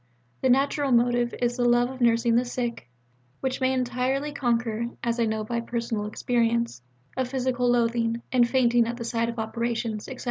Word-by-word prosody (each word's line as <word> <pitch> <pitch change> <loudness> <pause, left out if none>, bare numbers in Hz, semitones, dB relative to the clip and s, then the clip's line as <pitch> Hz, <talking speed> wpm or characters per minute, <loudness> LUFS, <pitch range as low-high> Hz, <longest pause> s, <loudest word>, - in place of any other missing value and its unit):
The 260 - +2
natural 275 +2 +2
motive 240 0 +2
is 240 +1 0
the 245 - +1
love 240 +1 +3
of 260 -1 -10
nursing 230 0 +3
the 240 - +4
sick, 240 - -4 0.5
which 265 0 -2
may 260 0 +3
entirely 260 +3 -1
conquer 235 -3 0 0.2
(as 235 0 -1
I 230 - +3
know 220 0 -1
by 235 +2 -2
personal 230 -3 -3
experience) 235 - 0 0.3
a 260 - 0
physical 250 -1 0
loathing 235 -1 +1
and 240 -2 +4
fainting 240 -3 +3
at 235 0 -4
the 235 - -5
sight 230 0 -1
of 235 - -6
operations, 225 -1 -2
etc. 260 - -8
240 Hz, 180 wpm, -26 LUFS, 230-250 Hz, 0.5 s, the